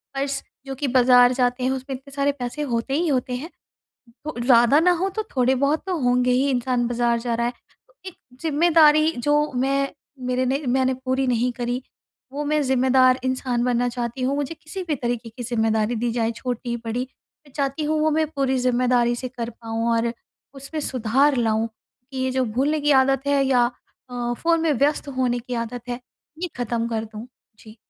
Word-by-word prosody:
Purse, 275 Hz, 0 st, -2 dB, 0.2 s
जो 270 Hz, 0 st, -5 dB
कि 275 Hz, +1 st, -2 dB
बाज़ार 250 Hz, 0 st, +5 dB
जाते 250 Hz, 0 st, 0 dB
हैं, 255 Hz, -, +1 dB
उसमें 265 Hz, +1 st, -4 dB
इतने 270 Hz, +2 st, -13 dB
सारे 280 Hz, 0 st, +2 dB
पैसे 245 Hz, +4 st, -4 dB
होते 235 Hz, +3 st, -1 dB
ही 335 Hz, +4 st, +1 dB
होते 255 Hz, -3 st, 0 dB
हैं। 285 Hz, +7 st, -6 dB, 0.8 s
हो 310 Hz, -, -4 dB
ज़्यादा 240 Hz, +3 st, +5 dB
ना 360 Hz, +2 st, +4 dB
हों 380 Hz, +2 st, 0 dB
तो 435 Hz, +3 st, -3 dB
थोड़े-बहुत 265 Hz, +4 st, +2 dB
तो 370 Hz, -2 st, -1 dB
होंगे 250 Hz, 0 st, +3 dB
ही, 265 Hz, +3 st, +2 dB
इंसान 250 Hz, -1 st, 0 dB
बाज़ार 240 Hz, -1 st, +1 dB
जा 235 Hz, 0 st, -2 dB
रहा 235 Hz, +1 st, 0 dB
है। 240 Hz, -, -3 dB, 0.5 s
एक 375 Hz, -, -7 dB, 0.3 s
ज़िम्मेदारी 315 Hz, -1 st, +4 dB
जो 295 Hz, +4 st, +1 dB
मैं 275 Hz, +1 st, +1 dB, 0.4 s
मेरे 255 Hz, +1 st, 0 dB
ने 270 Hz, +3 st, 0 dB
मैंने 260 Hz, +1 st, +2 dB
पूरी 260 Hz, +1 st, +1 dB
नहीं 245 Hz, 0 st, +1 dB
करी, 245 Hz, +1 st, -3 dB, 0.5 s
वो 290 Hz, +2 st, -3 dB
मैं 300 Hz, +1 st, +1 dB
ज़िम्मेदार 260 Hz, 0 st, +4 dB
इंसान 255 Hz, -2 st, -1 dB
बनना 245 Hz, 0 st, +1 dB
चाहती 240 Hz, +1 st, -4 dB
हूँ। 270 Hz, +2 st, +1 dB
मुझे 290 Hz, +2 st, -3 dB
किसी 315 Hz, +4 st, -7 dB
भी 300 Hz, -, 0 dB
तरीके 240 Hz, -2 st, -3 dB
की 240 Hz, +2 st, -8 dB
ज़िम्मेदारी 225 Hz, -1 st, 0 dB
दी 235 Hz, +1 st, -1 dB
जाए, 230 Hz, -1 st, 0 dB
छोटी, 240 Hz, 0 st, -4 dB
बड़ी, 230 Hz, +2 st, -2 dB, 0.5 s
मैं -, -, -18 dB
चाहती 275 Hz, +1 st, -2 dB
हूँ 310 Hz, +1 st, 0 dB
वो 310 Hz, -, +3 dB
मैं 315 Hz, +1 st, +1 dB
पूरी 270 Hz, -2 st, 0 dB
ज़िम्मेदारी 245 Hz, -1 st, +2 dB
से 255 Hz, +1 st, -5 dB
कर 240 Hz, -2 st, -5 dB
पाऊँ, 230 Hz, 0 st, -3 dB
और 230 Hz, 0 st, 0 dB, 0.4 s
उसमें 275 Hz, +3 st, -6 dB
सुधार 265 Hz, +3 st, +2 dB
लाऊँ 225 Hz, -1 st, +1 dB, 0.4 s
कि 265 Hz, -, -7 dB
ये 260 Hz, 0 st, 0 dB
जो 260 Hz, 0 st, +1 dB
भूलने 270 Hz, +7 st, 0 dB
की 295 Hz, -, +2 dB
आदत 270 Hz, +1 st, -1 dB
है 280 Hz, -1 st, +3 dB
या 245 Hz, -2 st, +3 dB, 0.4 s
अ, 240 Hz, -1 st, -2 dB
फ़ोन 330 Hz, -1 st, +1 dB
में 325 Hz, -1 st, +2 dB
व्यस्त 290 Hz, +3 st, +1 dB
होने 245 Hz, -2 st, +1 dB
की 245 Hz, +1 st, -7 dB
आदत 235 Hz, +1 st, -4 dB
है, 245 Hz, 0 st, -3 dB, 0.4 s
ये 360 Hz, -, -1 dB
खत्म 235 Hz, -1 st, -2 dB
कर 225 Hz, -1 st, -2 dB
दूँ। 215 Hz, +1 st, -9 dB, 0.3 s
जी। 215 Hz, 0 st, -14 dB
255 Hz, 195 wpm, -23 LUFS, 240-280 Hz, 0.8 s, बाज़ार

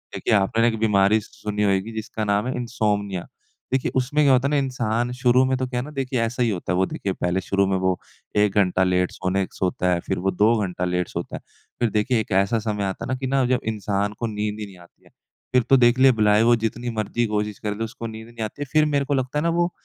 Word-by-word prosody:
देखिए -, -, 0 dB
आपने 110 Hz, +3 st, +3 dB
एक 115 Hz, -1 st, 0 dB
बीमारी 105 Hz, -1 st, +3 dB
स 105 Hz, -, -15 dB
सुनी 105 Hz, 0 st, -3 dB
होएगी 100 Hz, +2 st, +1 dB
जिसका 110 Hz, 0 st, -4 dB
नाम 100 Hz, +3 st, +1 dB
है 130 Hz, -, -2 dB
इन्सोम्निया। 105 Hz, -6 st, -2 dB, 0.5 s
देखिए 130 Hz, -1 st, +1 dB
उसमें 140 Hz, +4 st, +2 dB
क्या 135 Hz, -, +6 dB
होता 130 Hz, +2 st, +3 dB
है -, -, -2 dB
ना -, -, +2 dB
इंसान 120 Hz, -3 st, -1 dB
शुरू 125 Hz, 0 st, +4 dB
में 130 Hz, 0 st, +1 dB
तो 130 Hz, -, -1 dB
क्या 125 Hz, -1 st, -3 dB
है -, -, -2 dB
ना 150 Hz, -, -9 dB
देखिए 135 Hz, -3 st, -2 dB
ऐसा 120 Hz, +2 st, 0 dB
ही 120 Hz, -, +2 dB
होता 90 Hz, -4 st, -3 dB
है। -, -, 0 dB
वो 95 Hz, -, +3 dB
देखिए 95 Hz, -, -4 dB
पहले 90 Hz, +1 st, -1 dB
शुरू 100 Hz, +2 st, +1 dB
में 95 Hz, -, +1 dB
वो 95 Hz, -1 st, +1 dB, 0.4 s
1 105 Hz, -1 st, +3 dB
घंटा 95 Hz, -2 st, +3 dB
लेट 90 Hz, 0 st, +1 dB
सोने 95 Hz, +1 st, -1 dB
सोता 90 Hz, -1 st, -1 dB
है 85 Hz, -, 0 dB
फ़िर -, -, -1 dB
वो 95 Hz, -, +3 dB
2 105 Hz, +5 st, +3 dB
घंटा 90 Hz, -1 st, -3 dB
लेट 90 Hz, 0 st, -1 dB
सोता -, -, -5 dB
है। -, -, -13 dB, 0.4 s
फ़िर 120 Hz, -, +2 dB
देखिए 110 Hz, +3 st, +1 dB
एक 110 Hz, -, -9 dB
ऐसा 100 Hz, +4 st, +2 dB
समय 105 Hz, -2 st, -2 dB
आता 95 Hz, -1 st, -4 dB
है -, -, -7 dB
ना -, -, +1 dB
कि 130 Hz, -, -3 dB
ना 135 Hz, +1 st, +2 dB
अगर 125 Hz, 0 st, +2 dB
इंसान 100 Hz, -1 st, -1 dB
को 115 Hz, -, -1 dB
नींद 105 Hz, 0 st, -3 dB
ही 105 Hz, -, -4 dB
नहीं 95 Hz, -2 st, -14 dB
आती 85 Hz, -1 st, -20 dB
है। -, -, -20 dB, 0.4 s
फ़िर 125 Hz, -1 st, +4 dB
तो 135 Hz, -, +7 dB
देखलें 130 Hz, +2 st, +5 dB
भलाए 105 Hz, 0 st, +4 dB
वो 120 Hz, +1 st, +5 dB
जितनी 115 Hz, +2 st, -3 dB
मर्ज़ी 110 Hz, +3 st, 0 dB
कोशिश 105 Hz, -1 st, -2 dB
कर 105 Hz, -1 st, -3 dB
ले 115 Hz, -, -2 dB
उसको 115 Hz, +1 st, -7 dB
नींद 110 Hz, 0 st, -9 dB
नहीं 120 Hz, -1 st, -6 dB
आती 110 Hz, +7 st, -8 dB
है। -, -, -6 dB
फ़िर 155 Hz, -1 st, +5 dB
मेरे 140 Hz, -1 st, +1 dB
को 145 Hz, -, -1 dB
लगता 130 Hz, +2 st, -1 dB
है -, -, -2 dB
ना 170 Hz, -, +2 dB
वो 175 Hz, +1 st, +1 dB
110 Hz, 265 wpm, -23 LUFS, 100-125 Hz, 0.5 s, तो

